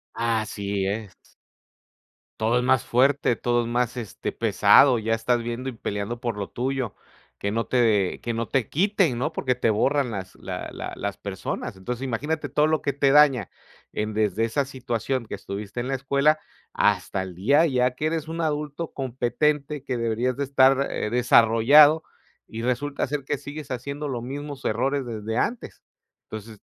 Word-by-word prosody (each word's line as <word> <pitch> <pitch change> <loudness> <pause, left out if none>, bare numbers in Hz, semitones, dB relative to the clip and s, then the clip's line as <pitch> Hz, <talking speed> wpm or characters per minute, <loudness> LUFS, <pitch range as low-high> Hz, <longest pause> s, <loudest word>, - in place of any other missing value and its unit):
Así 105 -4 -1
es. 105 0 -3 1.3
Todo 115 +2 +2
es 125 - +1
más 130 -1 +3
fuerte, 130 -1 +2
todo 120 0 +1
es 115 - -4
más, 120 0 0
este, 115 -5 -5
pesado, 130 -4 +5
ya 110 +1 0
estás 120 +2 +1
viendo 120 +3 -4
y - - -5
peleando 105 0 -4
por 120 -3 -3
lo 100 -1 -4
tuyo. 130 -3 -2 0.4
Que 100 - -2
no 115 +2 -1
te, 110 -7 +2
que 120 - -3
no 115 +1 -2
te 130 -5 0
quiten. 185 - +2
¿no? 135 +6 -1
Porque 130 -5 -1
te 120 -2 +1
borran 135 +5 +2
las, 95 -3 -6
la - - -6
la, - - -6
las 100 0 -4
personas. 95 -1 -5
Entonces 120 +7 -5
imagínate 145 +4 -2
todo 150 +3 +3
lo 155 0 +1
que 140 - -1
te 140 0 +2
daña 140 -7 +5 0.4
en, 105 0 -3
desde 105 0 +1
esa 135 +5 0
situación 130 -1 -3
que - - -4
estuviste 100 +3 -6
en 125 - -4
la 135 - 0
escuela 140 +3 +2 0.3
hasta 95 - +1
el 95 -2 -8
día, 140 - +4
ya 125 -3 +2
que 150 - -3
eres 160 -1 -2
un 165 +1 -4
adulto 150 +1 -3
competente, 135 +3 -1
que 130 -3 -3
deberías 115 +2 0
de 140 - -1
estar, 135 0 +4
eh, 105 - -2
desarrollado 125 +6 +6 0.4
y 110 - -6
resulta 140 +4 -1
ser 145 +1 -3
que 145 - -1
sigues 145 +1 -8
haciendo 140 +4 -4
los 125 -4 -4
mismos 140 +2 -6
errores 135 +5 0
desde 110 -1 -4
antes. 240 - -3 0.4
Entonces, 110 0 -9
125 Hz, 175 wpm, -25 LUFS, 115-140 Hz, 1.3 s, desarrollado